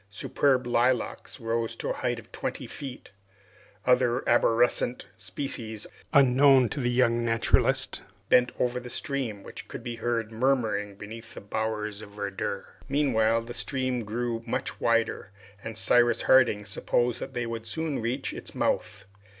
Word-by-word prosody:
Superb 130 +6 +1
lilacs 120 -2 0
rose 115 0 -2
to - - -4
a - - 0
height - - -1
of - - -12
twenty - - -4
feet. 135 -6 -8 0.7
Other 125 0 +3
arborescent 120 +1 +2
species, 110 +3 -4 0.3
unknown 135 -2 +6
to 150 - -4
the 120 -2 +1
young 120 -1 +2
naturalist, 115 -1 +2 0.3
bent 125 0 +5
over 125 0 +1
the 125 0 -9
stream, 120 -6 -3
which - - -9
could - - -8
be 120 -2 -5
heard 115 -2 -1
murmuring 110 -4 0
beneath 110 +3 -10
the - - -6
bowers 105 0 -3
of 110 - -10
verdure. 100 -2 -3 0.2
Meanwhile 115 -6 +2
the 120 +1 -7
stream 130 -2 -2
grew 115 +2 -2
much 130 +3 -3
wider, 115 -3 +1 0.3
and 110 -1 -6
Cyrus 120 0 +4
Harding 120 -6 +4
supposed 120 +3 0
that - - -7
they 120 -1 -1
would 115 -1 -5
soon 150 +3 -2
reach 125 +4 -2
its - - -7
mouth. 100 - -1
120 Hz, 150 wpm, -27 LUFS, 110-125 Hz, 0.7 s, unknown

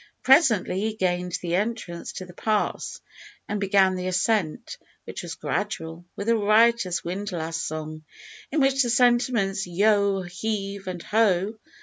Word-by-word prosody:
Presently 245 - +4
he 215 +1 -2
gained 180 -2 -1
the 170 -1 -2
entrance 200 -3 -2
to 185 - -6
the 180 - -13
pass 215 +3 -1 0.5
and 210 - -2
began 195 -1 +3
the 185 0 -3
ascent, 190 +2 -1 0.2
which - - -7
was - - -6
gradual, 170 -5 -4
with 200 - -5
a 230 - +4
riotous 215 -3 +3
windlass 175 -3 -3
song, 155 0 -5 0.5
in 300 +1 +1
which 270 0 +3
the 245 - +1
sentiments, 240 -6 +2
yo! 200 +1 +2
heave! 195 +1 -4
and 180 -2 -5
ho! 215 -1 +1
200 Hz, 140 wpm, -25 LUFS, 180-220 Hz, 0.5 s, Presently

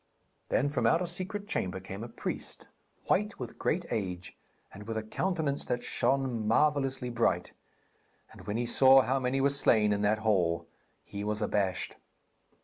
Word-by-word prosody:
Then 140 - +2
from 125 -5 +1
out 165 +8 +3
a - - -1
secret 190 +4 -5
chamber 95 - -2
came 95 +3 -7
a 120 - -7
priest, - - -5 0.4
white 210 +1 +1
with 120 -3 -8
great 175 +2 0
age, 90 -5 -3 0.4
and 105 +2 -10
with 115 -1 -3
a 110 - -2
countenance 150 - -1
that 120 0 -2
shone 130 -5 0
marvellously 135 0 +2
bright; 95 -7 0 0.8
and - - -14
when 105 - -1
he 120 - 0
saw 135 +3 +7
how 135 +2 +1
many 130 +1 0
were 140 +1 +3
slain 110 -7 +3
in 100 - -1
that 105 +1 +2
hall, 85 -5 +2 0.4
he 100 0 -6
was 105 0 -1
abashed. 95 -4 -1
120 Hz, 165 wpm, -30 LUFS, 105-140 Hz, 0.8 s, saw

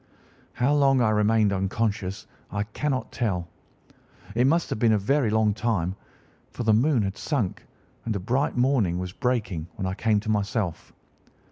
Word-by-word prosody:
"How 135 +4 +1
long 135 -2 +4
I 115 -3 +3
remained 105 -1 +3
unconscious 100 0 -2 0.2
I 100 0 -2
cannot 130 +5 -3
tell. 90 -8 -1 0.9
It 120 +4 +3
must 165 +4 +1
have - - -2
been 115 -1 +4
a - - +4
very 130 +4 +1
long 110 -1 +2
time, 100 -5 -1 0.5
for - - -5
the 110 -1 +4
moon 125 +1 +3
had 95 0 -4
sunk, 125 - -2 0.4
and 110 - -1
a - - -1
bright 125 +8 0
morning 125 -9 +2
was 90 0 -4
breaking 105 -11 -1
when 95 - -4
I 95 - -1
came 105 +1 +1
to 110 0 -2
myself. 105 -3 -2
110 Hz, 165 wpm, -25 LUFS, 100-125 Hz, 0.9 s, long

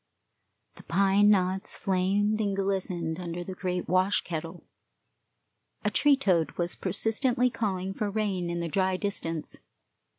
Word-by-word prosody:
The - - -11
pine 195 +3 +3
knots 190 0 +1
flamed 200 +3 +1
and 200 -2 0
glistened 185 -4 -2
under 175 0 -4
the 190 - -6
great 180 -1 -3
wash 185 +2 +2
kettle. 165 +1 -6 1.2
A - - +2
tree 290 -2 +4
toad 170 - +1
was 175 0 0
persistently 235 +6 +1
calling 195 -4 -2
for 210 +1 -2
rain 200 -4 -1
in 170 0 -2
the 170 - -2
dry 185 +2 +1
distance. 165 -6 -4
190 Hz, 135 wpm, -28 LUFS, 175-205 Hz, 1.2 s, tree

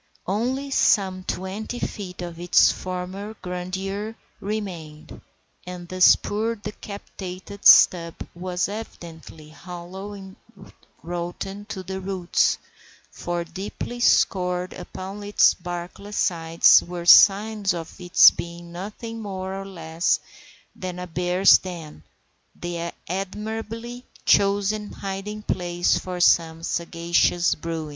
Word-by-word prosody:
Only 255 +8 -1
some 190 -7 +2
twenty 195 +6 -4
feet 185 -6 -5
of 170 -1 -7
its 175 0 +5
former 185 +4 -6
grandeur 190 +4 -4 0.2
remained, 180 -8 -6 0.5
and 180 -1 -7
this 185 +1 +6
poor, 220 +3 -2
decapitated 200 -2 -5
stub 170 -2 +7 0.2
was 180 +1 -2
evidently 165 -7 -9
hollow 180 +5 -9
and 195 0 -11 0.7
rotten 175 +4 -5
to 190 -2 -6
the 190 +1 -5
roots, 185 -2 +1 0.5
for 175 0 -3
deeply 200 +7 -6
scored 180 -5 +2
upon 190 +3 -8
its 205 0 +4
barkless 180 +3 -7
sides 165 -1 +5
were 175 0 -6
the - - -11
signs 205 +2 +6
of 170 +2 -6
its 175 0 +7
being 170 0 -8
nothing 215 +5 -7
more 190 -2 -5
or 195 0 -6
less 165 -2 -1 0.6
than 180 -1 -6
a 180 - -5
bear's 180 +2 +4
den—the 170 - -8 0.2
admirably 220 +6 -5 0.2
chosen 205 +1 +2
hiding 200 +2 -5
place 175 -3 0
of 180 -1 0
some 165 -1 +3
sagacious 170 +1 +1
Bruin. 160 -1 -5
185 Hz, 110 wpm, -24 LUFS, 175-205 Hz, 0.7 s, stub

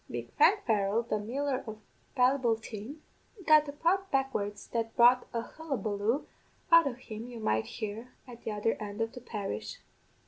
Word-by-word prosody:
Big - - -6
Frank 410 0 +5
Farrell, 210 0 +2
the 215 -2 -1
miller 260 +5 -2
of 220 -1 -6 0.4
Ballyboulteen, 245 -1 +1 0.5
got 305 -1 +6
a - - -3
prod 365 +6 0
backwards 215 -7 -1
that 225 -1 -2
brought 245 +1 +6
a 230 -1 -2
hullabaloo 235 -5 -2 0.5
out 335 -3 +8
of 245 -3 -4
him 225 -2 -8
you 240 -2 -8
might 110 - 0
hear 220 +2 -6 0.2
at 240 -2 -11
the - - -3
other 210 +1 0
end 205 0 -6
of 225 0 -1
the 250 - -10
parish. 195 - -5
235 Hz, 165 wpm, -30 LUFS, 215-270 Hz, 0.5 s, out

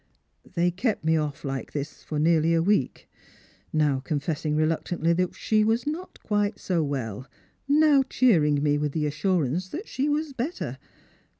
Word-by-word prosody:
" - - -26
They 175 0 +2
kept 205 +1 -1
me 160 0 +3
off 150 -3 -2
like 135 -1 -4
this 145 +1 -5
for 155 - -4
nearly 165 +1 +3
a 165 - +2
week; 190 -9 0 0.6
now 150 -3 +2
confessing 150 +2 -2
reluctantly 165 +2 +1
that 180 +1 -1
she 215 -1 +2
was 225 +4 +1
not 325 +5 -5
quite 205 -1 0
60 180 -3 -1
well; 130 -6 -3 0.4
now 295 -1 +5
cheering 150 - +3
me 145 0 +2
with 150 -1 -1
the 155 -1 0
assurance 170 +2 0
that 370 - -6
she 275 +3 -1
was 295 0 -1
better. 270 +8 -4
165 Hz, 165 wpm, -26 LUFS, 150-215 Hz, 0.6 s, now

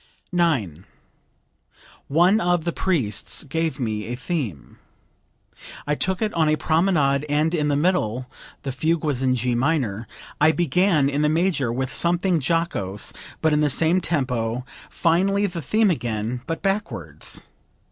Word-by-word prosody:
9. 130 - 0 1.2
"One 175 +9 +4
of 175 -2 +1
the 170 - -1
priests 140 - 0
gave 160 +2 -2
me 110 -4 -2
a 120 - -3
theme. 125 - -4 1.1
I 150 - 0
took 190 +7 -1
it 215 - -1
on 160 -2 +2
a 155 - +3
promenade 155 -4 +2
and 155 +3 +1
in 150 -3 +1
the 145 - +1
middle 140 - +1 0.4
(the 135 - -3
fugue 155 +5 0
was 145 -5 -1
in 130 -1 +2
G 125 0 0
minor) 120 -5 0 0.3
I 155 +2 +5
began 175 -2 +2
in 140 +1 0
the 150 - +3
major, 160 -6 +1
with 130 +2 -2
something 175 -1 +2
jocose 135 - -1 0.3
but 160 -1 +3
in 150 - +3
the 150 - +3
same 165 +6 +2
tempo; 125 -7 -1 0.2
finally 195 +5 +2
the 175 -4 -4
theme 215 - +2
again, 120 -3 -2
but 165 - -4
backwards. 195 +2 -2
150 Hz, 145 wpm, -23 LUFS, 125-175 Hz, 1.2 s, I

